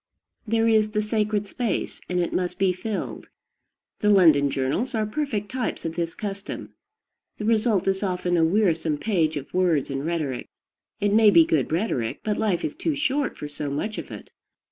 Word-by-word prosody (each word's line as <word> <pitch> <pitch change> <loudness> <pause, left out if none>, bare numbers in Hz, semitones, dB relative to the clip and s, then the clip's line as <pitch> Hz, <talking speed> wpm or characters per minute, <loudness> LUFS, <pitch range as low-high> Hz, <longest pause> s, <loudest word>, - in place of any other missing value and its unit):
There 225 +1 +2
is 215 -1 +4
the 210 - +2
sacred 210 -1 0
space, 230 +3 -3
and 180 0 0
it 175 - -1
must 180 -1 -1
be 190 -2 +2
filled. 200 +3 -5 0.7
The 210 - +2
London 160 -8 +6
journals 140 - -1
are 215 -1 +1
perfect 215 -4 -3
types 255 -8 -3
of 165 - -2
this 170 -1 -2
custom. 200 -1 -6 0.6
The 210 - -4
result 215 -3 +2
is 190 0 +1
often 180 -2 0
a 165 - +3
wearisome 165 -4 +2
page 160 -5 0
of 140 - -8
words 170 -7 +1
and 135 0 -3
rhetoric. 155 -6 -2 0.5
It 205 0 +1
may 220 0 +7
be 170 -5 +7
good 155 -4 0
rhetoric; 160 - -1
but 210 -1 -1
life 200 -6 0
is 145 - -4
too 315 - -1
short 285 -1 0
for 150 - -5
so 145 0 -5
much 210 +10 -3
of - - -8
it. - - -10
195 Hz, 185 wpm, -25 LUFS, 165-215 Hz, 0.7 s, may